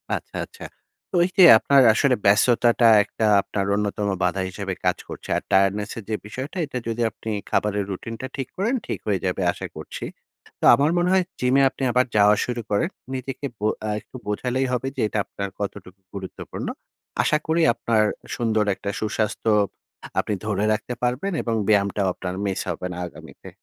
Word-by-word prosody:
আচ্ছা - - -8
আচ্ছা। 460 - -14 0.5
তো - - -3
ওই - - +2
যে 185 - +8
আপনার 140 +3 +4
আসলে 130 +2 +3
ব্যস্ততাটা 115 +3 +4 0.2
একটা 110 - -3 0.2
আপনার 100 0 -3
অন্যতম 105 0 -1 0.2
বাধা 90 +2 +1
হিসাবে 95 0 -4
কাজ - - +2
করছে। - - -9
আর - - -3
Tiredness 100 +2 +2
এর 115 - -6
যে 110 - 0
বিষয়টা 130 - -6
এটা 140 -3 -5
যদি 115 +1 -2
আপনি 110 - -8 0.2
খাবারের 105 -1 +1
Routine 115 +4 -6
টা 130 - -4
ঠিক 135 -2 -3
করেন, 220 +7 0
ঠিক - - -3
হয়ে 100 -3 +1
যাবে 90 +1 -1
আশা - - -6
করছি। - - -7 0.5
তো - - -1
আমার 145 +3 +2
মনে 175 +1 +2
হয় 190 -1 +4 0.2
Gym 125 +1 +2
এ - - +5
আপনি 135 - -7
আবার 125 +2 +3
যাওয়া 105 0 +6
শুরু 120 -1 -3
করেন। 105 - +1 0.3
নিজেকে 135 +2 -5
বো 105 - 0 0.2
আ - - -1
একটু 110 - -19
বোঝালেই 125 +5 -1
হবে 125 +2 -1
যে 130 - -2
এটা 105 - -2
আপনার 100 0 -5
কতটুকু 100 -1 -6
গুরুত্বপূর্ণ। 95 -2 -7 0.6
আশা 150 - +3
করি 165 +1 +2
আপনার 110 -2 +1 0.3
সুন্দর 110 -2 +1
একটা 100 - -5
সুস্বাস্থ্য 110 0 -1 0.7
আপনি 105 - -1
ধরে 105 -1 0
রাখতে 125 +3 -3
পারবেন 125 +11 0
এবং 115 -1 -1
ব্যায়ামটাও 100 -1 +2
আপনার 90 0 -5
Miss 95 -1 -1
হবে 90 +2 -3
না - - -7
আগামীতে। - - -13
110 Hz, 185 wpm, -23 LUFS, 100-130 Hz, 0.7 s, যে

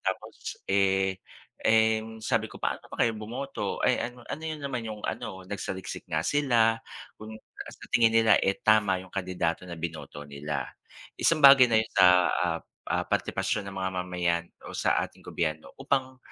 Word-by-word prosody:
Tapos, - - -5
eh 95 -1 +2 0.4
eh, 110 0 +4
'yong 110 0 -10
sabi 115 0 0
ko - - -12
"Paano - - -2
ba - - -8
kayo 115 -1 +2
bumoto?" 120 +6 -4
ay, - - +3 0.2
ano 125 - -16
ano 155 - -5
'yon 155 -1 -4
naman 125 -4 -3
'yong 110 -1 -6
ano 95 -1 -5
nagsaliksik 95 -2 -5
nga 80 - +1
sila 115 - +2 0.4
kung 110 0 -10 0.3
sa - - -12
tingin 115 -1 +5
nila, 115 -1 +5
eh, 95 - +1
tama 105 -4 +3
'yong 95 - -12
kandidato 90 -3 -2
na 90 -1 -7
binoto 80 -3 -6
nila. 75 +1 -4 0.5
Isang 165 -2 +2
bagay 135 -1 +10
na 110 - +5
'yon 110 - -5
sa, 95 -2 +7 0.2
ah - - 0 0.3
ah, - - 0
partipasyon 105 - -1
ng 95 - -10
mga 95 0 -1
mamayan 90 -2 -1 0.2
o - - -7
sa - - +2
ating - - -22
gobyerno 80 -2 -3
upang 130 -1 -1
110 Hz, 175 wpm, -28 LUFS, 90-115 Hz, 0.5 s, bagay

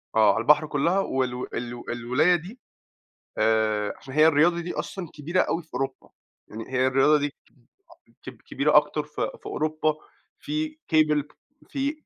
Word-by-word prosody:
آه، 110 -2 +5
على 115 - -1
البحر 150 +5 +4
كلّها 165 +6 +1
وال 130 -7 -2
ال 120 0 -6
الولاية 125 +9 +2
دي 185 +9 -7 0.8
آآ، 110 -1 +1
عشان 135 0 -11
هي 155 +1 +6
الرياضة 165 +3 +4
دي 175 +1 -5
أصلًا 185 -4 -5
كبيرة 160 +5 -1
أوي 170 - 0
في 155 -5 -21
أوروبا، 135 +1 -4 0.4
يعني 110 +1 -8
هي 130 0 +2
الرياضة 135 +3 +4
دي 145 0 -1
كب 130 -2 -32 0.6
كب - - -10
كبيرة - - +2
أكتر - - +2
ف - - -11
في - - -4
أوروبا 155 0 -1 0.4
في 305 +1 -3 0.2
cable 150 -2 +4 0.5
في 280 0 -1
150 Hz, 160 wpm, -25 LUFS, 125-170 Hz, 0.8 s, هي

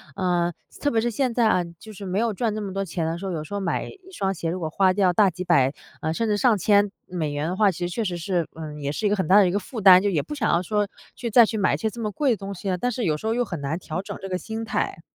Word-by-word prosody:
呃， 175 -2 +1 0.3
特 290 - +1
别 225 - +2
是 240 +1 0
现 255 +2 0
在 230 -1 +3
啊， 185 -4 +3 0.2
就 215 -1 -11
是 200 - -10
没 185 +1 -2
有 230 -1 +1
赚 220 +1 -1
这 215 - -3
么 195 -2 -5
多 195 0 -1
钱 165 -2 -3
的 165 +1 -2
时 195 - -7
候， 190 - -2
有 155 -3 -3
时 155 - -10
候 200 - -1
买 185 -4 -1
一 405 - -11
双 195 - -1
鞋， 165 -2 -3
如 180 - -3
果 160 -3 -3
花 190 +4 +3
掉 190 -2 +3
大 200 +2 +5
几 180 +1 -6
百， 140 -7 +3 0.3
呃， 160 - -1
甚 230 +7 -1
至 210 - +2
上 230 -1 +4
千 205 +1 +3 0.2
美 160 -5 -3
元 145 +2 -2
的 185 - -2
话， 205 -1 +4
其 175 - -9
实 175 - -6
确 230 - -1
实 175 -2 -2
是 170 -1 -1
呃， 155 -2 -7
也 140 -1 -2
是 210 +8 -3
一 - - +4
个 205 - +2
很 190 -5 -1
大 190 - +5
的 200 - +6
一 - - 0
个 200 - 0
负 225 +4 -7
担， 185 -1 +9
就 205 - +1
也 155 -7 0
不 165 - -7
想 235 -7 +1
要 170 - +3
说 210 +1 0 0.3
去 235 - -4
再 235 +1 +7
去 220 - -3
买 195 - +2
一 - - -3
些 220 - -1
这 235 +2 -8
么 215 -2 -2
贵 275 +3 +1
的 220 - +1
东 195 +1 -6
西 195 - -7
了， 185 - +1
但 245 +7 -1
是 240 -2 -2
有 155 - +2
时 220 - -5
候 225 - +1
又 245 0 +1
很 175 -8 -5
难 140 +4 -2
调 175 0 -4
整 - - -7
这 195 - -5
个 185 - -1
心 225 +2 -5
态。 190 - -2
195 Hz, 365 characters per minute, -24 LUFS, 175-220 Hz, 0.3 s, 担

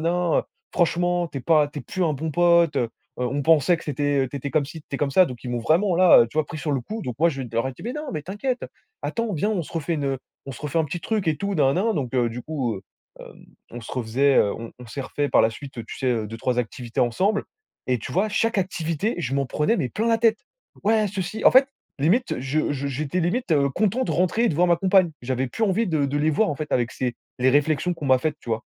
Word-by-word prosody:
nin, 175 +1 0
nin, - - -13 0.3
franchement 175 0 +1
tu 140 - -5
es - - -7
pas 150 0 +3
tu 145 - -8
es - - -7
plus 185 - -3
un 155 - +1
bon 155 +3 -3
pote, 170 -1 +4
heu-heu, 120 -3 0 0.3
on 125 +3 -1
pensait 160 +2 +4
que - - -11
c'était, 145 -1 0
heu, - - -5
tu 140 - -6
étais 140 +1 -4
comme 145 +2 +2
ci, 160 +1 -9
tu - - -54
étais 135 - -4
comme 145 -2 0
ça». 185 +6 +6
Donc, 125 -5 -8
ils 125 - -6
m'ont 120 - -1
vraiment, 170 - +2
là, 180 -10 +7
tu - - -12
vois, 155 - +3
pris 155 +2 -7
sur 150 +1 -3
le 135 - -1
coup. 220 - -6
Donc, 125 - -4
moi, 170 +1 +4
je 135 -2 -6
d 120 - -7
je 115 - -6
leur 115 - +1
ai - - -5
dit: - - -14
«Mais, 240 +3 -3
non, 300 - -4
mais 155 - -3
t'inquiète, 210 - -3 0.4
attends, 230 -2 -2
viens, 190 +5 0
on 190 -6 0
se - - -12
refait 165 0 -2
une, 145 -3 -2
heu, 135 -1 -1 0.3
on 135 - -7
se 115 - -11
refait 150 +2 -1
un 160 - +2
petit 170 +4 -5
truc 215 0 -2
et 155 - +1
tout 200 0 -2
nin, 135 -4 +3
nin, 190 - +1
nin», 225 - +1
donc, 135 -7 -3
heu, 120 -2 +2
du 120 +1 -6
coup, 135 -8 -2
heu, 95 - -10 0.4
hem, - - -13 0.2
on 120 - -7
se 115 - -10
refaisait, 130 +3 +1
heu, 100 - +4
on 115 0 -7
on 125 - -11
s'est 125 +5 -6
refait 145 +2 -2
par - - +5
la 110 - +4
suite, 135 +4 -10
tu - - -8
sais, 130 - 0
heu, 115 -3 0
2-3 115 +3 -2
activités 120 0 -3
ensemble 185 - +1 0.4
et 125 -2 +2
tu 125 - -7
vois, 205 +6 +1
chaque 225 +1 +1
activité, 180 +2 -1
je 135 -6 -3
m'en 140 -1 0
prenais, 150 - +1
mais, 130 - -1
plein 220 - -1
la 230 0 +3
tête. 225 -2 +3 0.5
«Ouais, 215 0 +3
ceci» 190 +2 -4
en - - +9
fait 265 +1 +6 0.3
limite, 190 - +2
je 145 +3 0
je 140 0 -3
j'étais 145 +5 -2
limite, 185 +3 0
heu, 140 -2 +3
content 215 - 0
de - - -3
rentrer 185 +6 +1
et - - +4
de 155 - -2
voir 180 +3 +3
ma 170 - +4
compagne. 185 -2 +3
J'avais 130 +1 -1
plus 225 - -1
envie 210 +2 +1
de 155 -5 +1
de 140 +1 -2
les 155 +2 +2
voir, 210 +6 +2
en 150 - -2
fait, 150 +1 -5
avec 120 -1 +1
ces 125 -2 -2 0.2
les 125 +1 +3
réflexions 150 +5 +2
qu'on 165 -3 -8
m'a 130 -1 +5
faites, 150 +2 -2
tu 120 - -8
vois? 110 +1 -1
155 Hz, 290 wpm, -24 LUFS, 130-185 Hz, 0.5 s, en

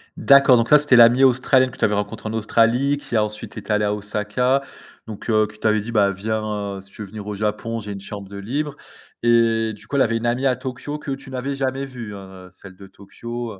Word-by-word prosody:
D'accord, 140 -2 +6
donc 115 0 0
ça 150 - +7
c'était 145 -3 +3
l'amie 120 +2 +7
australienne 130 0 +4
que - - -13
tu - - +2
avais 105 - +1
rencontré 105 +1 -3
en - - -5
Australie, 115 +5 +2
qui 130 -4 -6
a 110 - +3
ensuite 105 0 -6
été - - -6
allé 105 0 +1
à 105 - 0
Osaka, 105 +6 -1 0.4
donc, 110 +1 -8
heu, 110 -1 +3
qui 105 - -17
t'avait 110 -1 +2
dit: 110 +3 -6
«Bah, 100 -3 +3
viens 110 +3 -3 0.4
heu - - -9
si 95 +1 -19
tu - - -11
veux 105 - -6
venir 105 +1 -9
au 105 - -4
Japon, 105 +2 -2
j'ai 105 -1 -7
une 100 - -8
chambre 100 0 -8
de 100 - -10
libre». 140 +9 -3 0.5
Et 115 -1 +2
du 105 - -13
coup - - -5
elle 140 - +3
avait 115 -1 0
une 115 - -5
amie 125 +3 0
à 130 - +2
Tokyo 130 +3 -6
que 145 - -6
tu 135 0 -7
n'avais 130 +2 -4
jamais 135 0 -2
vue, 120 -6 -8
hein? 95 -1 -12
Celle 95 0 -14
de 95 +1 -13
Tokyo, 115 +5 -8
heu 100 - -14
115 Hz, 250 wpm, -21 LUFS, 105-130 Hz, 0.5 s, ça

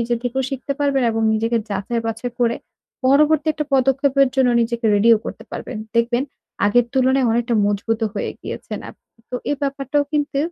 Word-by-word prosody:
নিজের 235 0 0
থেকেও 265 +2 -1
শিখতে 270 +1 -3
পারবেন। 280 -2 +2
এবং 225 0 -1
নিজেকে 225 +2 +1
যাচাই 205 +4 -2
বাছাই 230 +2 -3
করে 235 -1 +2 0.5
পরবর্তীতে 305 +2 +3
পদক্ষেপের 270 +1 +3
জন্য 260 -2 +4
নিজেকে 235 0 -2
রেডিও 225 +3 +5
করতে - - -7
পারবেন। 245 - -6 0.2
দেখবেন, 240 +2 +2 0.4
আগের 240 +3 +3
তুলনায় 260 0 +3
অনেকটা 235 +1 0
মজবুতও 220 +2 0
হয়ে 200 - -2
গিয়েছেন - - -6
আপনি। - - -23 0.2
তো - - -5 0.2
এই 290 - 0
ব্যাপারটাও 275 +1 0
কিন্তু 290 -1 0
245 Hz, 160 wpm, -20 LUFS, 230-275 Hz, 0.5 s, রেডিও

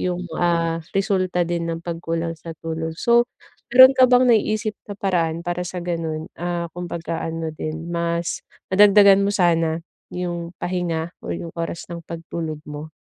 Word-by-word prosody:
yung, 180 0 -2 0.2
ah, 165 -1 +1 0.2
resulta 185 -2 +1
din 170 -1 -2
ng 165 0 -3
pagkulang 165 -1 -3
sa 165 +1 -8
tulog. 160 0 -4
So 235 0 +4 0.4
meron 260 +1 +10
ka 260 - +7
bang 250 0 +6
naiisip 215 -1 +2 0.2
na - - -4
paraan 170 -4 0
para 175 0 -1
sa 180 - -5
ganon, 160 -2 -3
ah, 175 0 -3
kumbaga 170 -1 -4
ano 165 -1 -3
din 155 +2 -5
mas 170 0 -1 0.3
nadagdagan 200 0 +7
mo - - +1
sana 165 -4 +2 0.3
yung 175 -1 -4
pahinga 175 -2 -2
o - - -7
yung 165 -1 -6
oras 170 0 -4
ng 170 - -6
pagtulog 165 -2 -5
mo? 150 +1 -7
170 Hz, 155 wpm, -22 LUFS, 165-185 Hz, 0.4 s, meron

